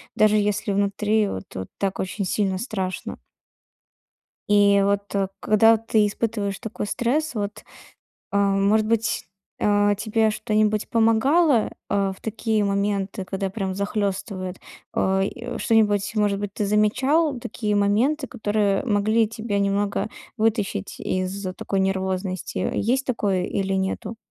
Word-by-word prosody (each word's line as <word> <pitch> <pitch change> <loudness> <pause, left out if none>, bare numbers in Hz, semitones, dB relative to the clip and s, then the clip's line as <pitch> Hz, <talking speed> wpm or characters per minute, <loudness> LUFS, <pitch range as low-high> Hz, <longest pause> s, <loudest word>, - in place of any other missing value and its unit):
даже 215 0 +4
если 210 0 0
внутри 205 +2 +1
вот 95 - -5
вот 95 0 -4
так 195 -1 -1
очень 190 +1 -2
сильно 190 0 0
страшно. 190 -4 -4 1.3
И 200 -1 +5
вот 200 0 0 0.3
когда 225 +1 +5
ты 220 -1 +2
испытываешь 205 -1 -2
такой 220 -1 -5
стресс, 275 +9 0
вот, 205 -2 -4 0.7
а, 200 - +2 0.2
может 210 +2 +3
быть, 225 0 0 0.4
а, 205 0 +3
тебе 220 +1 +1
что-нибудь 215 0 0
помогало, 230 +4 +3 0.2
а, 200 -1 +1
в 190 - -14
такие 220 -1 -1
моменты, 200 -1 -1
когда 195 +1 -3
прям 195 -2 -3
захлёстывает? 195 -2 -2 0.4
А, 190 0 +1
и 240 +4 -4
что-нибудь, 210 -3 +2
может 205 -2 +1
быть, 205 -1 -4
ты 210 - -1
замечал 260 +9 +2
такие 210 -2 -2
моменты, 235 +9 +2
которые 210 -5 0
могли 215 0 +2
тебя 220 -2 -2
немного 200 +1 0 0.3
вытащить 210 -3 -1
из 185 +2 -2
такой 195 +2 -3
нервозности. 190 -1 -1 0.2
Есть 255 +6 0
такое 200 -7 0
или 195 +1 -1
нету? 190 +3 -2
205 Hz, 130 wpm, -23 LUFS, 195-220 Hz, 1.3 s, И